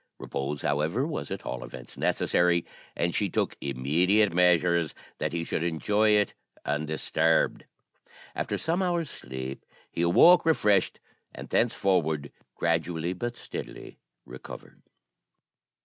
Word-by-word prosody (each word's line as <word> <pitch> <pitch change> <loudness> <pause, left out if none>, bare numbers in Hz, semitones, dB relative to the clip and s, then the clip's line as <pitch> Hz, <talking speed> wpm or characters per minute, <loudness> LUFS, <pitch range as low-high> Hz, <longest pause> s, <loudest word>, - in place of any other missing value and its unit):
Repose, 70 +1 -4
however, 80 - 0
was 155 -1 -4
at 95 - -6
all - - -4
events 65 -1 -10
necessary, 85 -1 +1 0.3
and 85 0 0
she 100 - 0
took - - -1
immediate 85 +10 +2
measures 85 -2 +3 0.2
that - - -1
he 85 0 -2
should 80 - -2
enjoy 105 +6 +1
it 105 -1 +3 0.3
undisturbed. 80 +2 0 0.7
After - - -2
some 170 +4 -1
hours' 175 -4 -1
sleep, 65 +2 -7 0.3
he - - -3
awoke 130 - +6
refreshed, 105 - +2 0.4
and - - -9
thenceforward 90 -11 +1 0.2
gradually 85 +1 -1
but 120 +6 -4
steadily - - -8 0.3
recovered. 65 +1 -11
85 Hz, 115 wpm, -27 LUFS, 75-105 Hz, 0.7 s, awoke